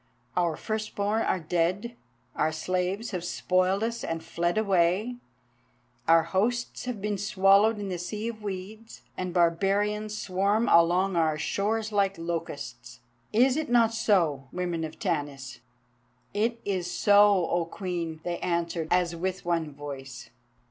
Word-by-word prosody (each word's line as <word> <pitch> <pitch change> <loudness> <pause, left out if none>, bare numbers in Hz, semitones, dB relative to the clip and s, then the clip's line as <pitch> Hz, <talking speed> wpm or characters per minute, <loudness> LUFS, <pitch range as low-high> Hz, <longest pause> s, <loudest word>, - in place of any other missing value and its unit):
Our 170 -3 +1
first 215 -1 -4
born 205 +2 0
are 190 - +1
dead, 180 +8 -1 0.4
our 155 - +1
slaves 185 +7 -2
have 180 -4 -3
spoiled 185 +3 +1
us 230 +1 -2
and 165 0 -3
fled 175 +3 -1
away, 200 +3 +2 0.9
our 165 0 +6
hosts 220 +11 -1
have 250 -4 -4
been 205 0 -2
swallowed 200 +1 +4
in 205 -1 -4
the 180 -2 -3
Sea 210 +6 -4
of 220 -2 -8
Weeds, 210 +3 -7
and 185 -1 -3
barbarians 200 +5 +1
swarm 200 +4 +1
along 175 +3 +4
our 160 -2 +2
shores 215 +6 -1
like 195 -1 +1
locusts. 140 -7 -6 0.3
Is 250 +4 +4
it 315 -4 -2
not 230 -2 +4
so, 170 - +1
women 175 -2 -2
of 155 - -9
Tanis?" 145 - -3 0.7
"It 230 +3 0
is 185 -3 -1
so, 205 -2 +5
O 170 -1 +1
Queen," 170 -3 -4
they 175 -1 -3
answered, 170 -2 -1
as 175 -1 +2
with 185 +2 -3
one 165 -3 0
voice. 135 -3 -8
185 Hz, 140 wpm, -27 LUFS, 170-210 Hz, 0.9 s, our